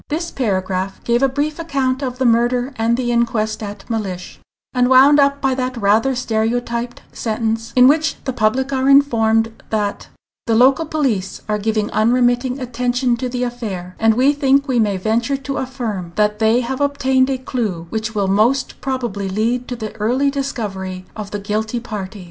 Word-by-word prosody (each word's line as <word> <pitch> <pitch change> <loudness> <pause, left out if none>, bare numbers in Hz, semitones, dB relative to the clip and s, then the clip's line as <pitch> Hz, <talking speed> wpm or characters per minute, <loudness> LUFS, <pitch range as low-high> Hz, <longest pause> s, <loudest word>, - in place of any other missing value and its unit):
This 335 +3 -3
paragraph 190 -5 -2
gave 235 +1 +1
a 270 - +4
brief 295 +4 -2
account 275 -5 -1
of 255 -2 -3
the 260 - 0
murder 245 +3 +2
and 230 +1 +1
the 245 -1 -1
inquest 230 -2 0
at 205 -1 -7
Mellish, 195 -6 -4 0.3
and 250 -1 +2
wound 270 +3 +7
up 280 0 +3
by 270 -1 +2
that 255 -1 -3
rather 225 +5 +2
stereotyped 235 +1 -2
sentence, 225 0 -2
in 250 0 +7
which 305 +2 +2
the 260 - -3
public 255 +5 0
are 265 0 +1
informed 225 -5 +3
that 210 -2 -2 0.4
"the 225 - +2
local 270 +7 +4
police 240 -12 -1
are 210 -1 0
giving 215 0 -1
unremitting 245 +3 +2
attention 245 0 0
to 250 +1 -3
the 250 0 -2
affair, 205 -7 -5
and 225 0 +3
we 265 +4 +4
think 280 0 +2
we 255 -3 +1
may 205 -3 +1
venture 230 +7 0
to 275 +1 -5
affirm 225 -10 -4
that 210 0 +1
they 225 +2 +3
have 260 +3 -4
obtained 265 -2 +2
a 265 - 0
clew 220 -10 -3
which 220 0 -3
will 200 -2 +1
most 225 +7 +1
probably 240 -8 -3
lead 230 +5 -1
to 250 - -4
the 220 -3 -6
early 255 +6 +1
discovery 195 -9 -4
of 210 -2 -6
the 205 - -4
guilty 215 +3 -2
party." 210 -4 -6
240 Hz, 180 wpm, -19 LUFS, 215-260 Hz, 0.4 s, wound